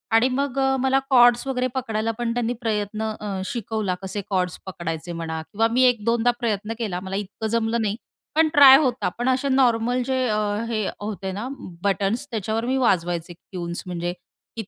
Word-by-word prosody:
आणि 225 +3 +5
मग 275 0 -1
अ, 270 0 +2
मला 265 +1 +3
कॉर्ड्स 245 -2 +6
वगैरे 255 -1 0
पकडायला 225 -3 -1
पण 240 -1 -1
त्यांनी 240 0 -1
प्रयत्न 215 -2 -2 0.2
अ, 200 -3 -4
शिकवला 215 -3 -2
कसे 195 +2 -4
कॉर्ड्स 180 -2 0
पकडायचे 170 -2 -5
म्हणा 160 -1 -4
किंवा 215 +7 0
मी 255 +2 +3
1-2दा 235 -1 +2 0.2
प्रयत्न 220 -2 -1
केला. 200 -6 -2
मला 190 +1 -5
इतकं 205 +2 -4
जमलं 230 +1 0
नाही. 210 -1 0 0.4
पण 320 0 +5
ट्राय 270 -2 +10
होता. 260 -4 0
पण 245 +2 0
असे 260 +2 +1
नॉर्मल 245 -2 +2
जे 260 0 0
अ, 210 -2 +1 0.3
हे 215 -3 -1
होते 205 -2 -4
ना 210 +6 -4 0.4
बटन्स 200 +6 0
त्याच्यावर 220 +1 -2
मी 260 +2 0
वाजवायचे 175 -8 0
ट्यून्स 175 0 -6
म्हणजे 175 0 -3 0.4
की 225 - -3
225 Hz, 175 wpm, -23 LUFS, 195-250 Hz, 0.4 s, ट्राय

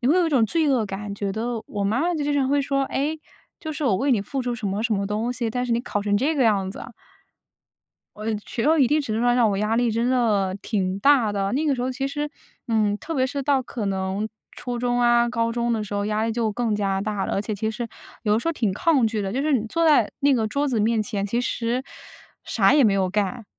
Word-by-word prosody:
你 245 - +1
会 315 - +4
有 355 -2 +3
一 - - +1
种 260 -7 +3
罪 320 +1 +1
恶 245 -5 +2
感， 200 +1 -5
觉 200 -1 -3
得 230 +1 -3
我 200 -1 -3
妈 220 +6 +1
妈 345 +2 +1
就 295 -2 -2
经 290 - 0
常 270 -2 +1
会 285 0 +2
说， 275 0 0
诶， 300 +4 -2 0.4
就 315 - -5
是 300 0 -4
我 230 - +3
为 275 +5 0
你 225 -5 +3
付 270 +7 -4
出 245 -1 -2
什 220 - -5
么 200 +2 -1
什 230 -1 0
么 200 0 -1
东 220 +4 -1
西， 240 -2 -2
但 250 +2 -2
是 240 - -1
你 230 - +1
考 205 -4 -3
成 205 0 +1
这 290 +9 +1
个 270 - +2
样 200 -4 +2
子。 - - -8 1.3
我 215 - -8 0.2
觉 230 - -3
得 315 +2 +3
一 270 - +5
定 300 +4 +2
程 250 -7 -2
度 225 - 0
上 245 0 +3
让 235 -3 +4
我 195 - -1
压 210 +2 0
力 240 -1 +2
真 230 +2 0
的 210 -7 +1
挺 190 -3 -1
大 265 -4 +4
的， 200 -1 -1
那 295 +5 0
个 285 - +3
时 245 - -3
候 260 +1 -1
其 270 +2 -2
实， 295 +1 -3 0.4
嗯， 215 -3 +1
特 325 +9 -6
别 260 -2 +2
是 280 +1 -3
到 275 -1 +2
可 235 -3 -5
能 195 +2 -1 0.3
初 245 -1 -5
中 245 0 0
啊， 240 0 +4
高 230 -1 0
中 235 0 -1
的 220 -2 0
时 205 - -9
候 205 0 -1
压 215 +1 0
力 225 - -1
就 225 -1 0
更 225 0 -1
加 195 -2 0
大 205 -1 -2
了， - - -2
而 195 - 0
且 215 0 -3
其 220 +2 -2
实 235 +2 -4 0.4
有 210 0 +2
时 330 - -2
候 - - +1
挺 220 - 0
抗 270 - +2
拒 215 -1 -2
的， 195 - -2
就 260 +7 -1
是 305 +1 +1
你 230 -5 +1
坐 330 +8 0
在 305 -2 +4
那 280 0 +4
个 225 -4 +1
桌 280 +6 0
子 245 -6 0
面 220 +1 +2
前， 205 -3 -3
其 235 +4 -1
实 245 +2 -1 0.6
啥 195 -1 +3
也 295 -1 +5
没 210 -4 +4
有 190 -2 +1
干， 210 +3 -1
235 Hz, 295 characters per minute, -23 LUFS, 210-265 Hz, 1.3 s, 一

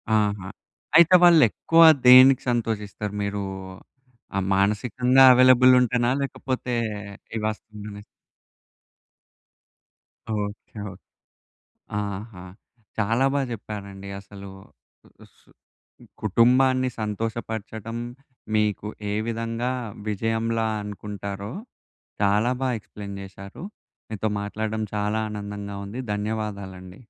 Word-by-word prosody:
ఆహా! 100 -3 0 0.5
అయితే 170 +2 +7
వాళ్లేక్కువ 165 0 +5 0.2
దేనికి 130 +1 +8
సంతోషిస్తారు? 105 -3 -2
మీరు 100 0 -3 0.9
ఆ! - - +1 0.2
మానసికంగా 125 +6 +3
అవైలబుల్ 130 0 +6
ఉంటేనా 120 0 +1
లేకపోతే 130 -2 -3 0.6
ఏ - - -1
వాస్తవంగానా 105 -1 -7 2.3
ఓకే. 105 +1 -6
ఓహ్! 95 - -11 1.0
ఆహా! 100 -1 -6 0.6
చాలా 115 +5 +2
బా 140 - +2
చెప్పారండి 100 -3 -8
అసలు. 100 0 -11 0.9
సు - - -28 0.7
కుటుంబాన్ని 130 +5 +3
సంతోషపరచడం 110 0 -4 0.6
మీకు 105 -1 0 0.2
ఏ - - -1
విధంగా 115 +2 -2 0.4
విజయంలా 115 +2 -1 0.2
అనుకుంటారో, 100 0 -6 0.7
చాలా 105 +4 +3
బా 130 - +1
ఎక్స్‌ప్లేయిన్ 100 -1 -9
చేశారు. 100 - -10 0.5
మీతో 110 0 -2
మాట్లాడడం 110 +1 -3
చాలా 105 +1 0
ఆనందంగా 100 -1 -6
ఉంది. 110 +6 -6
ధన్యవాదాలండి. 100 -4 -5
105 Hz, 85 wpm, -24 LUFS, 100-120 Hz, 2.3 s, దేనికి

